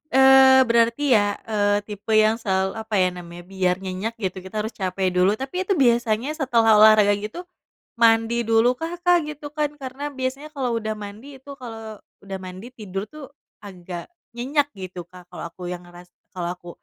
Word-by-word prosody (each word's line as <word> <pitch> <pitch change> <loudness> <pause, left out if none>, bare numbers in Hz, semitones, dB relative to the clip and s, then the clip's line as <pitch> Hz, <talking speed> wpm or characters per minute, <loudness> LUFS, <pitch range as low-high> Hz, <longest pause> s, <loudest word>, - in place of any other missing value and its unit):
Eee, 265 0 +7
berarti 235 +4 +2
ya, 205 -1 +2
eee, 205 -1 +1
tipe 210 +1 -4
yang 215 +1 +4
sela 190 -3 0 0.2
apa 220 - -2
ya 185 -2 +3
namanya, 175 -1 -10
biar 185 0 0
nyenyak 190 +5 -4
gitu 190 -4 -4
kita 190 +3 -5
harus 220 - -4
capek 190 -1 -1
dulu. 180 +3 +3
Tapi 275 +10 -4
itu 395 - +3
biasanya 240 -2 +2
setelah 245 -7 +2
olahraga 215 -1 +7
gitu, 215 - -6 0.6
mandi 230 0 +3
dulukah, 250 +9 +2
Kak, 350 -3 +3
gitu 295 -1 -8
kan? 300 -1 -1
Karena 275 0 -6
biasanya 265 +3 -4
kalau 250 -4 -1
udah 215 -1 -3
mandi 210 +7 -10
itu, 280 - -16
kalau 225 -3 -8 0.2
udah 195 -1 -6
mandi 185 +4 -9
tidur 200 -5 -6
tuh, 305 -2 -9 0.4
agak 180 -3 -8 0.3
nyenyak 280 +4 0
gitu, 185 -2 -7
Kak, 180 0 -15
kalau - - -8
aku 180 +1 -8
yang 180 0 -6
ngeras 175 0 -14 0.2
kalau 175 -2 -4
aku, 175 -1 -13
220 Hz, 175 wpm, -23 LUFS, 190-260 Hz, 0.6 s, Eee